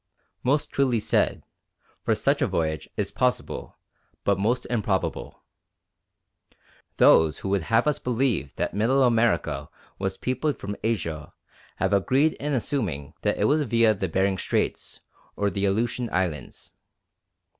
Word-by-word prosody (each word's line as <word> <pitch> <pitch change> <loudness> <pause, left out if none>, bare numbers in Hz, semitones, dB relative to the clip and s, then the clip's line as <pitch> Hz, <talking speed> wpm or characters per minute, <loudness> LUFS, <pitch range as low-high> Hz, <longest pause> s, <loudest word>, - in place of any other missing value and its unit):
Most 140 +4 0
truly 130 -4 +2
said, - - +1 0.6
for - - +1
such - - +1
a - - +3
voyage 80 -2 -2
is - - -1
possible, - - -2 0.5
but 100 -1 +1
most 120 +5 0
improbable. 105 -5 -2 1.5
Those 80 -1 +5
who 95 - -5
would 100 -1 +1
have 115 +1 +3
us 150 -1 +1
believe 120 - -1
that - - -2
Middle 120 +7 +2
America 115 - +1 0.3
was 95 -1 -2
peopled 130 +4 -1
from 100 +1 -5
Asia 85 -9 -2 0.4
have 95 +1 0
agreed 135 +10 +3
in 150 +1 -2
assuming 105 - -2
that - - 0
it - - 0
was 150 +2 +3
via 115 -4 +3
the 95 -2 -3
Behring 95 +2 +1
Straits - - -2 0.3
or 100 -1 0
the 100 0 -1
Aleutian 115 +4 0
Islands. 85 -8 -3
105 Hz, 135 wpm, -25 LUFS, 95-125 Hz, 1.5 s, Those